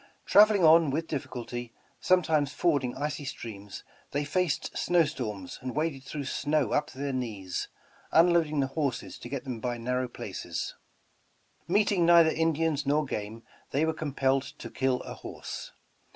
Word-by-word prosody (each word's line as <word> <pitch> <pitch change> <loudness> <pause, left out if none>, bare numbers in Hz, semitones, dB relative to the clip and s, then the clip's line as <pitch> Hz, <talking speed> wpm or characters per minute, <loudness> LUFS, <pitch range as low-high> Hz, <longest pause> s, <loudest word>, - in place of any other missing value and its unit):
Traveling 210 -2 +6
on 160 -1 +7
with 155 +4 -1
difficulty, 120 -4 -5 0.2
some 185 0 +4
times 150 -3 +1
fording 140 -5 +1
icy 145 +1 -3
streams, 105 -7 -7 0.3
they 145 +1 0
faced 175 0 -1
snow 175 -2 +3
storms 105 - -5
and 130 -1 -5
waded 155 -3 -1
through 145 +1 -5
snow 150 +2 0
up 150 0 +1
to - - -14
their 140 0 -2
knees, 105 -8 -3 0.4
unloading 165 -3 +4
the - - +2
horses 140 -6 -2
to 120 - -8
get 140 -1 -4
them 125 -4 -5
by 120 +1 -2
narrow 125 +2 -1
places. 120 - -5 0.9
Meeting 200 0 +3
neither 170 -1 +7
Indians 160 -2 +1
nor 150 +1 +2
game, 110 -2 -5 0.3
they 145 +4 +1
were 160 - 0
com 155 -3 -5
pelled 135 0 +1
to - - -8
kill 130 -1 0
a - - -7
horse. - - -7
145 Hz, 160 wpm, -29 LUFS, 125-160 Hz, 0.9 s, on